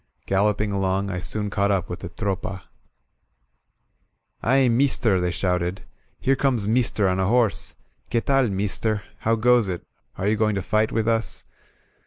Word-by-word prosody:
Galloping 105 +1 +1
along, 95 0 0
I 90 - -3
soon 105 +2 -2
caught 100 0 +1
up 95 -3 +1
with 90 - -6
the 85 - -7
Tropa. 95 0 -4 1.8
"Aye, 130 +2 +3
meester!" 115 -5 +2
they 90 - 0
shouted. 90 +1 -1 0.4
Here 135 - +2
comes 125 -7 +1
mees 120 +2 +3
ter 100 -3 +1
on 95 0 0
a 95 - +1
horse! 110 -5 +1 0.3
Que 120 - +2
taly 135 0 +2
meester? 100 +2 -1 0.2
How 115 +1 +1
goes 120 -1 +3
it? 90 -2 -4 0.3
Are 95 - -1
you 105 +1 +2
going 110 -1 +1
to 100 - -2
fight 110 +2 +1
with 110 0 0
us?'' 115 -1 0
105 Hz, 165 wpm, -24 LUFS, 95-115 Hz, 1.8 s, Aye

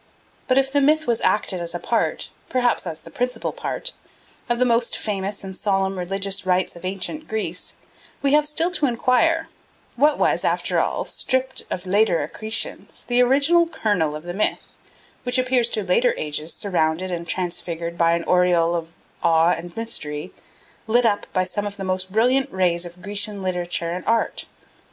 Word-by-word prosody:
But 255 - +3
if 270 0 +3
the 285 0 +3
myth 310 +3 +3
was 235 -2 +1
acted 190 -3 +1
as 170 0 -4
a - - -2
part, 230 +5 -1 0.2
perhaps 245 -6 +1
as 160 -1 -5
the - - -13
principal 250 -2 -2
part, - - -4 0.6
of 240 - +2
the 250 - +3
most 235 -1 +2
famous 200 -1 -3
and 190 -1 -7
solemn 195 -1 0
religious 195 +2 -1
rites 185 0 +1
of 170 - -12
ancient 195 +12 -3
Greece, 220 0 -3 0.5
we 280 0 +3
have 300 0 +4
still 330 +4 +1
to 305 -5 +2
enquire, 265 +7 +2 0.5
What 290 +4 +3
was, - - +2
after - - +1
all, - - -1
stripped 260 0 -1
of 180 - -4
later 195 -2 +3
accretions, 220 +1 -3
the 245 0 +3
original 285 +7 +4
kernel 200 - 0
of 155 - -7
the 175 0 -5
myth 210 +3 -2 0.4
which 245 +1 +1
appears 255 -2 +2
to 215 - 0
later 215 +7 +2
ages 150 +1 -1
surrounded 180 -1 0
and 170 -1 -4
transfigured 170 -2 -3
by 170 0 +3
an 170 0 0
aureole 175 -2 +3
of 165 -1 -4 0.3
awe 165 +1 +4
and 170 +2 -5
mystery, 180 -8 -4 0.5
lit 240 +2 +3
up 205 -3 +1
by 185 - +1
some 205 +3 -3
of 200 0 -7
the 195 - -5
most 185 0 -1
brilliant 255 +6 +2
rays 175 -2 +1
of 175 +1 -15
Grecian 205 -1 -1
literature 175 -2 -2
and 180 +1 -4
art? 230 0 0
200 Hz, 175 wpm, -22 LUFS, 175-245 Hz, 0.6 s, have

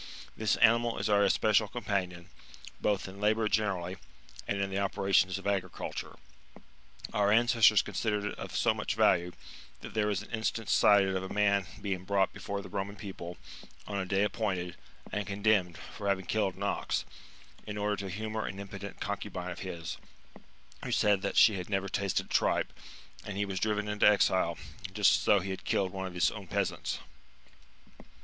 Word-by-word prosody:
®^ - - -10 0.3
This 110 -1 +1
animal 115 +1 +4
is - - -1
our 105 -1 +4
espe 100 +2 +3
cial 105 0 +3
companion, 95 -5 -3 0.5
both 100 -2 0
in 95 +1 -10
labour 110 +1 +2
generally, 95 -4 -1 0.5
and 100 - -1
in 100 0 -1
the 95 - -1
operations 95 -1 +2
of 100 - -10
agriculture. 95 -3 -3 1.0
Our 105 0 +3
ancestors 115 -2 +5
considered 105 -2 -1
it 105 - -4
of - - -6
so - - +3
much - - -3
value, 85 +1 +3 0.5
that - - -9
there 105 -1 +1
is 100 -3 -1
an - - -14
instance 110 -1 -2
cited 100 -2 +5
of 95 - 0
a 95 - -6
man 100 -2 +2
being 95 -3 -3
brought 95 0 +1
before 100 0 -5
the - - -10
Eoman 100 0 -4
people, 90 -4 -7 0.5
on 100 -1 -3
a 95 - -2
day 95 +1 +2
appointed, 95 -4 -2 0.4
and 105 -1 -2
condemned, 100 -4 +1
for 100 +3 -7
having 95 -2 0
killed 95 -1 0
an 100 - -6
ox, 100 - -1 0.6
in 105 0 -5
order 105 0 0
to 100 -1 -5
humour 110 +3 -3
an 95 - -6
impudent 100 -1 -8
concu - - -4
bine 90 0 -5
of 85 - -7
his, 85 -3 -5 0.9
who - - -4
said 105 -2 +3
that 100 - -2
she 105 -3 +7
had 90 +1 -6
never 95 -1 0
tasted 100 -1 -1
tripe; - - +1 0.5
and 100 -1 -6
he 100 - +1
was 95 -2 -3
driven 105 0 0
into 105 0 +3
exile, 95 -4 +2 0.4
just - - +5
as - - -5
though 100 - +5
he 95 +1 -4
had 95 - -6
killed 95 -2 0
one 95 0 -4
of 90 - -9
his 90 - +3
own 100 -3 -8
peasants. - - -1
100 Hz, 185 wpm, -30 LUFS, 95-105 Hz, 1.0 s, she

